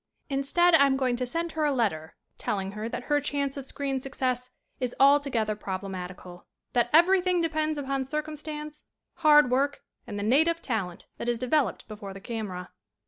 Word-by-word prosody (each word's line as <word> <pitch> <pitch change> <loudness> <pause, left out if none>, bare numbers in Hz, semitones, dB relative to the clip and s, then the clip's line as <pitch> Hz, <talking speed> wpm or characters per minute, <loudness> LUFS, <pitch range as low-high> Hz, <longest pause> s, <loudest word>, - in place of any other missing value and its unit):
"Instead 305 +6 +3
I 280 -3 +7
am 265 -1 +1
going 255 -2 +1
to 250 0 -2
send 335 +5 -2
her 315 -1 -2
a 295 - +3
letter 195 - -1 0.2
telling 195 -1 -2
her 215 +2 -5
that - - -5
her 295 -1 +1
chance 280 -1 -2
of 275 -2 -5
screen 275 -1 -2
success 255 -2 -2 0.3
is 250 -2 -2
altogether 275 -6 +4
proble 195 -1 -5
matical; 180 -1 -8 0.3
that 240 -1 +2
everything 360 +2 +5
depends 310 -2 0
upon 275 -1 -2
circum 305 +3 -3
stance, 300 0 -7 0.3
hard 295 -5 +6
work 280 +3 +1 0.2
and 205 -3 -5
the 205 - -3
native 320 +9 +3
talent 195 - -3
that 240 - -2
is 240 - +1
developed 255 +2 0
before 205 -3 -8
the - - -7
camera." 195 -4 -5
270 Hz, 180 wpm, -27 LUFS, 220-300 Hz, 0.3 s, I